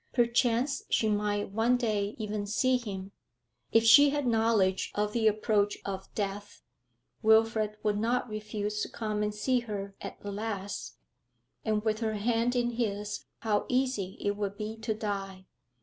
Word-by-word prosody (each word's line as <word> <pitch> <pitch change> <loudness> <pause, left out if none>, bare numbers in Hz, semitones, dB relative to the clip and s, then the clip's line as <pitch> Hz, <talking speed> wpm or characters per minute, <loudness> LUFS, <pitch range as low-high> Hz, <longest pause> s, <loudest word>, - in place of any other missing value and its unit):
Perchance 240 +2 +2
she 220 - +2
might 205 -1 0
one 230 +4 +3
day 210 -4 -1
even 210 -1 -3
see 255 +5 +2
him. 195 -5 -6 0.6
If 225 - +5
she 280 +6 +8
had 290 -1 -1
knowledge 220 -5 +2
of 210 0 0
the 225 -2 +2
approach 210 -1 +2
of 195 -1 -5
death, 205 0 -4 0.6
Wilfrid 220 -1 +3
would 210 -1 +1
not 240 +3 +1
refuse 210 -1 -3
to - - -2
come 215 -2 -3
and 210 0 0
see 245 +5 +1
her 205 -4 -5
at - - -7
the 205 - -5
last, 205 -1 -4 0.7
and 215 -1 0
with 215 -1 0
her 220 -2 -1
hand 230 +3 +1
in 240 -1 +1
his 210 -3 -3 0.2
how 215 -2 +1
easy 250 -7 0
it 205 0 -1
would 200 -1 -3
be 215 +1 -4
to 220 -1 -2
die. 195 -3 -4
215 Hz, 160 wpm, -30 LUFS, 205-230 Hz, 0.7 s, she